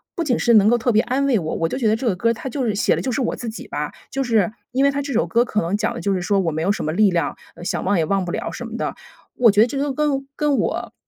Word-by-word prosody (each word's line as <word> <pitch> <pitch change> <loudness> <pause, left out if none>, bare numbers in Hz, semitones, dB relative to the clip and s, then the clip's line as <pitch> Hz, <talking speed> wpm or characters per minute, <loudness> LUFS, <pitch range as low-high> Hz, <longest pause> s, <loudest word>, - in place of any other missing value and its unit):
不 340 - -1
仅 255 -6 +1
是 240 - +3
能 210 -1 +6
够 240 - +4
特 240 +1 +1
别 220 0 +4
安 260 +4 0
慰 255 -4 +3
我， 160 -3 -3
我 165 -1 0
就 - - -3
觉 245 -4 +1
得 215 - +3
这 230 - -5
个 205 - +2
歌 230 +6 +1
儿， - - +3
它 255 +3 -6
就 270 +1 -3
是 215 -3 0
写 205 - +2
的 - - -3
就 260 - -2
是 270 - -1
我 240 - -1
自 240 - -7
己 220 - -8
吧。 - - -4 0.2
就 270 0 -1
是 225 -5 +2 0.2
因 260 +2 +1
为 280 - +4
她 280 +1 -2
这 280 -1 -4
首 235 - +2
歌 235 +1 +3
可 215 -3 -1
能 170 +4 -1
讲 220 +2 -1
的 240 - -6
就 200 - 0
是 185 - -1
说 200 +2 +1
我 175 -4 0
没 160 +1 -3
有 185 +5 +2
什 - - -2
么 155 - -1
力 200 +4 +3
量， 170 -4 -1 0.2
呃， - - -11
想 - - -2
忘 200 +1 +1
也 160 - +2
忘 195 +2 0
不 175 - -4
了 - - -3
什 - - -6
么 - - -7
的。 - - -3 0.4
我 235 -3 +5
觉 205 +1 +4
得 230 - +5
这 275 - -4
个 280 0 -1
跟 275 -2 -1
跟 295 -2 +1
我 - - -2
230 Hz, 375 characters per minute, -21 LUFS, 195-265 Hz, 0.4 s, 能